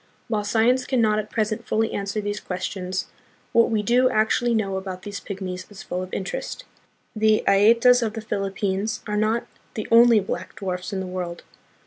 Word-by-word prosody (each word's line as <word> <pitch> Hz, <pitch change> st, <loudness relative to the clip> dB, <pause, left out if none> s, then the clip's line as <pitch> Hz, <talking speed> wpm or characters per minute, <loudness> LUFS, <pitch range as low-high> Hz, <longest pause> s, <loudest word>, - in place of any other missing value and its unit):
While 215 Hz, -2 st, 0 dB
science 235 Hz, +4 st, +2 dB
can 260 Hz, -2 st, +1 dB
not 215 Hz, -2 st, +3 dB
at 215 Hz, 0 st, -5 dB
present 215 Hz, 0 st, -2 dB
fully 220 Hz, +1 st, 0 dB
answer 200 Hz, +1 st, -2 dB
these 205 Hz, 0 st, -3 dB
questions, 185 Hz, 0 st, -4 dB, 0.5 s
what 230 Hz, -, +4 dB
we 220 Hz, -2 st, 0 dB
do 250 Hz, +4 st, +4 dB
actually 230 Hz, +1 st, +2 dB
know 195 Hz, -3 st, 0 dB
about 190 Hz, -1 st, -6 dB
these 205 Hz, 0 st, -5 dB
pygmies 185 Hz, -2 st, -6 dB
is 205 Hz, -2 st, -11 dB
full 180 Hz, -, -3 dB
of 185 Hz, 0 st, -7 dB
interest. -, -, -4 dB, 0.5 s
The 215 Hz, 0 st, +3 dB
Aetas 230 Hz, +5 st, +5 dB
of 220 Hz, -2 st, -1 dB
the 225 Hz, -, -5 dB
Philippines 200 Hz, 0 st, -2 dB
are 210 Hz, -, -2 dB
not 215 Hz, +2 st, +1 dB, 0.3 s
the 215 Hz, -, -4 dB
only 230 Hz, -1 st, +7 dB
black 195 Hz, -, -5 dB
dwarfs 185 Hz, 0 st, -4 dB
in 195 Hz, -1 st, -2 dB
the -, -, -4 dB
world. 180 Hz, -2 st, -5 dB
210 Hz, 180 wpm, -24 LUFS, 190-225 Hz, 0.5 s, only